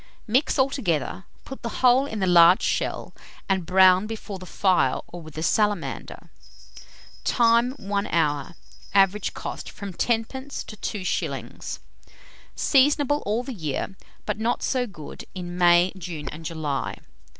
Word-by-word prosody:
Mix 250 +8 +1
altogether, 195 - 0 0.2
put 270 - -9
the 235 - -3 0.2
whole 255 +3 +5
in 220 - -5
the - - +2
large 175 0 +6
shell, - - -1 0.3
and 190 -4 0
brown 185 +1 +5
before 215 -3 -6
the 185 - -10
fire 190 -1 +2
or 175 - -10
with 155 -1 -12
a 160 - -2
salamander. 205 -1 -1 0.9
Time. 235 +1 +3
1 200 -5 -3
hour. 150 -1 0 0.4
Average 195 +1 +3
cost, - - -6
from 200 -2 -8
10d. 245 +7 -2
to 215 - -9
2s. 200 -2 -4 0.8
Seasonable 290 +1 +3
all 220 +4 0
the 260 0 -6
year; 160 - -3 0.3
but - - -2
not 230 +2 0
so 250 -2 0
good 155 -8 -10
in 175 -1 -6
May, 175 0 +5
June, 170 -5 -7
and 160 +2 -9
July. 150 -4 -3
195 Hz, 140 wpm, -25 LUFS, 175-235 Hz, 0.9 s, large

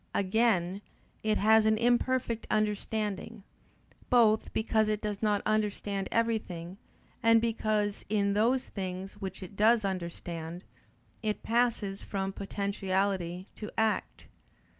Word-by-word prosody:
Again 195 -2 +2 0.4
it 215 0 +1
has 220 +1 +5
an 220 0 +4
imperfect 240 0 +1
understanding; 210 0 -1 0.7
both 225 -3 +4
because 220 0 +1
it 215 -1 0
does 210 -2 -4
not 210 -2 +1
understand 205 -2 -1
everything, 200 -6 -1 0.4
and 230 -1 +6
because, 215 -3 0
in 200 -1 +2
those 235 +5 +2
things 190 0 -5
which 190 0 -5
it 185 +2 -10
does 220 +1 +4
understand, 170 -2 -4 0.6
it 215 -1 -2
passes 230 -4 0
from 195 -1 -3
potentiality 195 -2 -1
to 210 - -6
act. 220 -1 0
210 Hz, 115 wpm, -30 LUFS, 195-220 Hz, 0.7 s, and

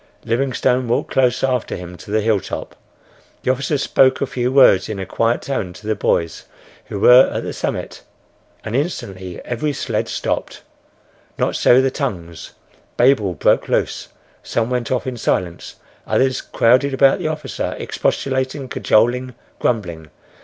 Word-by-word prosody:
Livingstone 125 +1 0
walked 115 - -1
close 130 -1 +2
after 130 -3 0
him 90 0 -8
to 90 - -13
the 110 +1 +1
hilltop. 105 -3 -2 0.7
The 130 - +2
officer 135 +3 -1
spoke 130 -1 +3
a - - 0
few 125 -1 -2
words 130 -9 +5
in 110 - -4
a 95 - -4
quiet 115 +5 0
tone 105 -10 -3
to 105 +4 -14
the 110 - +1
boys 85 -5 -1 0.4
who 100 - -6
were 125 +5 +7
at - - -3
the - - -5
summit, - - -4 0.6
and 110 +1 -4
instantly 95 - -4
every 135 +5 -2
sled - - -2
stopped. - - -3 0.7
Not - - 0
so 125 +2 +5
the 135 - +1
tongues. 85 - -5 0.4
Babel 115 -8 +3
broke - - +2
loose. - - -1 0.3
Some 115 +1 -2
went 125 -2 -2
off 130 - 0
in 130 -2 -4
silence; 90 -6 -2 0.3
others 130 0 +1
crowded 130 +4 +2
about 135 0 +4
the - - -2
officer, 155 -1 -4
expostulating, 130 0 -2
cajoling, 125 +3 +1 0.2
grumbling. 85 -9 -2
125 Hz, 150 wpm, -19 LUFS, 105-130 Hz, 0.7 s, were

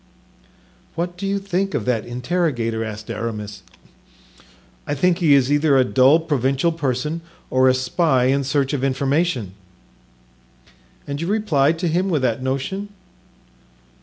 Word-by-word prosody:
"What 175 +2 -3
do 195 +2 -4
you 200 +1 0
think 195 0 -2
of 105 - -2
that 120 -2 -1
interrogator?" 120 -4 -1
asked 110 +1 -6
Aramis. 105 -2 -5 1.3
"I 145 - -1
think 180 +4 +2
he 155 -5 +5
is 135 0 +2
either 145 -1 +3
a 130 - +5
dull 130 +5 +4
provincial 140 0 0
person 150 +1 -2 0.3
or 130 0 +4
a 130 - +3
spy 130 +1 +1
in 135 +2 +2
search 135 +1 0
of 135 -2 -2
information." 135 - 0 1.5
"And 140 +1 -5
you 170 - -2
replied 165 -8 +2
to 175 +1 -1
him 180 +4 0
with 155 -7 0
that 120 0 0
notion?" 140 +10 -3
140 Hz, 140 wpm, -21 LUFS, 125-170 Hz, 1.5 s, he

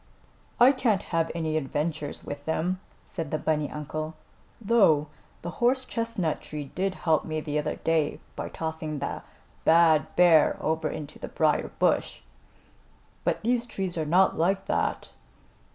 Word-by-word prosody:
"I 245 +2 +8
can't 235 -7 +1
have 165 -1 +2
any 160 -2 -1
adventures 150 +1 -3
with 145 0 -7
them," 175 +3 -1 0.3
said 165 -5 -5
the 155 - -1
bunny 150 -2 0
uncle, 155 +1 -5 0.4
"though 195 -10 +4 0.3
the 175 - -4
horse 255 +2 +3
chestnut 230 -10 -2
tree 150 -2 -7
did 190 +1 -1
help 160 -2 +1
me 155 -1 -3
the 150 0 -2
other 150 - -2
day 160 -2 0 0.2
by - - -4
tossing 160 -1 -4
the 140 - -4 0.4
bad 160 -3 +4
bear 170 -3 +5
over 160 0 -1
into 150 -1 -7
the - - -5
briar - - +1
bush. - - +1 1.0
But - - -1
these 240 +1 +1
trees 190 -5 -3
are 160 -2 -2
not 185 +5 +4
like 190 +4 +1
that." - - -1
160 Hz, 150 wpm, -27 LUFS, 155-190 Hz, 1.0 s, I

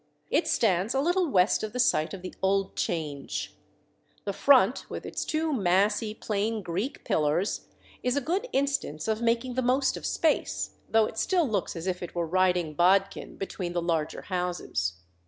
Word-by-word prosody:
It - - +2
stands 200 +1 +2
a - - +3
little 350 +5 +2
west 185 -3 +3
of 215 0 -4
the 250 - -3
site 245 -11 +2
of 190 -2 -8
the 185 - -6
"old 195 0 +1
Change." 150 -4 -3 0.7
The 200 - -1
front, 255 -1 +4
with - - -6
its - - -3
two 315 -1 -1
massy 210 +1 +2
plain 215 0 -2
Greek 195 +11 -3
pillars, 155 +6 0 0.3
is 250 +2 0
a - - +4
good 360 - -1
instance 270 - -1
of 220 0 0
making 235 +2 +1
the 260 - 0
most 260 +2 +2
of - - -4
space, 320 - 0 0.2
though 225 -1 +4
it 220 - -5
still 355 -5 +2
looks 205 -6 -1
as 165 0 -5
if 185 -1 -2
it 175 - -7
were 170 -1 0
riding 180 -2 +1
"bodkin" 190 +5 +2
between 185 -2 -4
the 175 - 0
larger 165 -2 -1
houses. 180 - -2
200 Hz, 175 wpm, -28 LUFS, 180-250 Hz, 0.7 s, front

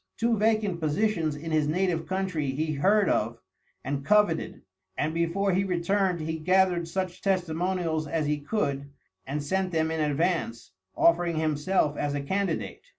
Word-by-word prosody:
Two 230 0 +2
vacant 215 -4 +1
positions 160 0 0
in 160 +2 -6
his 155 -2 +2
native 170 0 0
country 185 -6 -1
he 155 +4 -1
heard 195 +7 +3
of 115 +2 0 0.5
and 140 +1 -3
coveted, 205 0 +2 0.3
and 155 +1 -1
before 170 +4 0
he 190 +2 +2
returned 185 0 0
he 160 +1 -3
gathered 180 0 +2
such 185 +1 -3
testimonials 175 -3 -1
as 155 +1 -1
he 150 0 0
could, 140 -5 -2 0.4
and 145 +2 -3
sent 190 +5 0
them 160 -1 0
in 160 - -2
advance, 150 - -1 0.3
offering 170 0 +3
himself 155 0 +1
as 145 0 -1
a 145 - -2
candidate. 190 +7 -2
165 Hz, 150 wpm, -27 LUFS, 150-190 Hz, 0.5 s, heard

